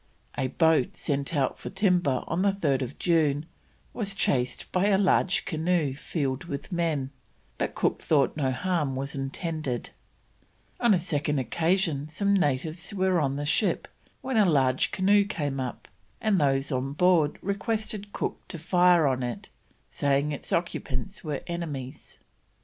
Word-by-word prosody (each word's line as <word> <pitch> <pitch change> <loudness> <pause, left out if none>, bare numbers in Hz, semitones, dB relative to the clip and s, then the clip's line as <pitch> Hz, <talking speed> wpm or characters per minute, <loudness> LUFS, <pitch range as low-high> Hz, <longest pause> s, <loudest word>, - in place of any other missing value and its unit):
A 130 - 0
boat 160 -2 +2
sent 140 +3 -1
out 140 -2 0
for - - -6
timber 180 - +1
on 170 +2 -1
3rd 145 -10 0
June 155 -4 +2 0.5
was 200 -4 -2
chased 125 -12 0
by 185 +2 +2
a 200 -2 +4
large 195 -1 +2
canoe 160 -3 0
filled 140 0 -3
with 140 0 -6
men, 160 -6 -1 0.5
but - - -2
Cook - - 0
thought 140 -5 +2
no 140 -4 0
harm 150 -1 -1
was 135 +1 -4
intended; 140 -1 -3 0.9
on 235 -4 +5
a - - +1
second 150 -4 -1
occasion 160 - 0
some 200 +5 +1
natives 160 +2 0
were 185 -3 +2
on 135 -1 0
the 145 +1 -3
ship, 180 +7 +1 0.3
when 260 -2 -2
a 210 - +6
large 130 -4 +2
canoe 200 +2 +4
came 145 -9 -3
up, 130 -2 -5 0.3
and 205 -6 +2
those 135 0 +1
on 130 +1 -1
board 165 -2 +3
requested 205 +1 -3
Cook - - -3
to 175 - -5
fire 175 0 +4
on 130 -2 +1
it, 120 -2 -5 0.4
saying 140 +1 +1
its 145 - -6
occupants 180 +3 -2
were 150 -4 -3
enemies. 150 -6 -6
155 Hz, 150 wpm, -27 LUFS, 140-185 Hz, 0.9 s, a